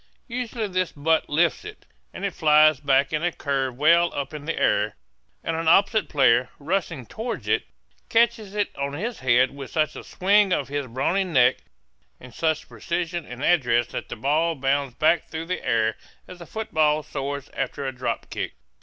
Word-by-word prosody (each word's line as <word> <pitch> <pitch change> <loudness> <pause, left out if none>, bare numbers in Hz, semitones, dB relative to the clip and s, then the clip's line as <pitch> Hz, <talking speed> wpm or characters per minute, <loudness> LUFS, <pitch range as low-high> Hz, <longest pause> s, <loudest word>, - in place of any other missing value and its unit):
Usually 240 -3 -3
this 185 -2 -1
butt 160 +2 0
lifts 165 +3 +1
it, 425 0 -11 0.3
and - - -5
it 195 - -2
flies 155 -3 +5
back 140 +1 +2
in 155 - 0
a 175 +1 +1
curve 135 -5 -2
well 170 +4 +4
up 140 +2 -4
in 150 -1 -7
the 165 - -2
air; 105 +1 +1 0.5
and 165 - -2
an 165 0 -2
opposite 200 +6 +4
player, 125 -3 +3
rushing 165 -3 -2
toward 230 - -5
it, - - +1 0.4
catches 225 -3 +2
it 205 -1 -1
on 140 0 -3
his 220 +10 -4
head 130 0 +3
with 140 -2 -8
such 155 -2 0
a - - -8
swing 200 +1 +3
of 140 - -1
his 145 -1 -3
brawny 135 +11 0
neck, 130 -9 +3 0.6
and 125 0 -13
such 160 -2 -1
precision 175 -1 -3
and 125 +2 -8
address 120 -9 +3
that - - -6
the - - -5
ball 155 +7 +1
bounds 135 -1 0
back 160 +2 +2
through 160 +1 -5
the 180 +2 -4
air 115 -2 +1 0.3
as 180 -1 -11
a 170 - -10
football 155 -8 0
soars 140 -1 -5
after 135 +1 -3
a 135 - -1
drop 125 +1 -3
kick. - - -4
155 Hz, 185 wpm, -24 LUFS, 135-175 Hz, 0.6 s, flies